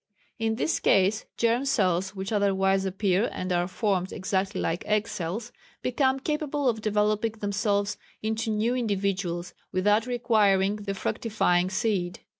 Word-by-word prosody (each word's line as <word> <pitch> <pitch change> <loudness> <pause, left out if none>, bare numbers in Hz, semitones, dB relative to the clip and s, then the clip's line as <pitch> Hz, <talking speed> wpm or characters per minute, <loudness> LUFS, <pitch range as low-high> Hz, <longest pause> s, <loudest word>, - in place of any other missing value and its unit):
In 225 0 0
this 315 - 0
case 195 +3 +3
germ 235 +2 +2
cells 190 -7 +1
which 190 +2 -4
otherwise 195 -2 +2
appear 195 +2 +1
and 185 0 -3
are 175 0 +1
formed 190 -1 -1
exactly 190 +1 -1
like 165 +1 -1
egg 215 +1 +1
cells, 210 +7 -4 0.3
become 265 +1 +1
capable 295 -1 -1
of 225 -3 +1
developing 210 +1 +1
themselves 205 -1 -1 0.2
into 220 +1 -2
new 220 +3 +1
individuals 195 -6 -1 0.2
without 210 +5 +2
requiring 210 -5 +2
the 200 -1 -4
fructifying 185 -4 +1
seed. 190 -3 -1
205 Hz, 135 wpm, -27 LUFS, 190-225 Hz, 0.3 s, case